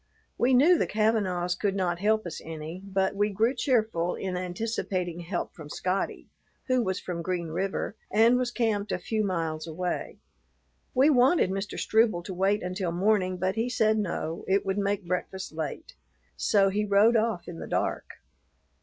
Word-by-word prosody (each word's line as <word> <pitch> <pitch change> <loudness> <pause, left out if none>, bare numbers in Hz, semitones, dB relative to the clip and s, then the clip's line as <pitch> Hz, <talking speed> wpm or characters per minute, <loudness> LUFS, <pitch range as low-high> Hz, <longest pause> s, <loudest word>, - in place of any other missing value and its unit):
We 255 +1 +3
knew 320 +7 +6
the - - +1
Kavanaughs 200 -5 +1
could 200 0 -1
not 175 -3 0
help 215 +2 +2
us 170 - -6
any, 160 +2 -7
but 195 -1 0
we 205 +1 +2
grew 220 +5 +1
cheerful 220 -9 +1
in 185 -1 -4
anticipating 180 -1 -3
help 175 +1 -4
from 150 -3 -11
Scotty, 185 +5 -2 0.4
who 255 -1 +3
was 190 -4 -1
from 175 -2 -5
Green 175 -1 -2
River 195 +5 -2
and 225 +4 +5
was 250 -1 +1
camped 220 -4 -1
a - - 0
few 215 +4 -1
miles 165 -4 -2
away. 175 +2 -3 0.8
We 275 +4 +5
wanted 260 - +4
Mr. 195 +2 -4
Struble 215 -6 +2
to 190 - -6
wait 195 +3 +1
until 180 -1 -2
morning, 185 0 +1
but 185 +1 0
he 225 +3 -1
said 220 -2 +2
no, 170 -4 -3
it 195 +1 +2
would 195 +1 0
make 200 -1 -1
breakfast 185 +2 -3
late; 160 - -5 0.4
so 195 -2 +3
he 205 +2 0
rode 210 +3 +4
off 220 -5 0
in 170 -2 -7
the - - -6
dark. - - -1
195 Hz, 170 wpm, -27 LUFS, 180-220 Hz, 0.8 s, knew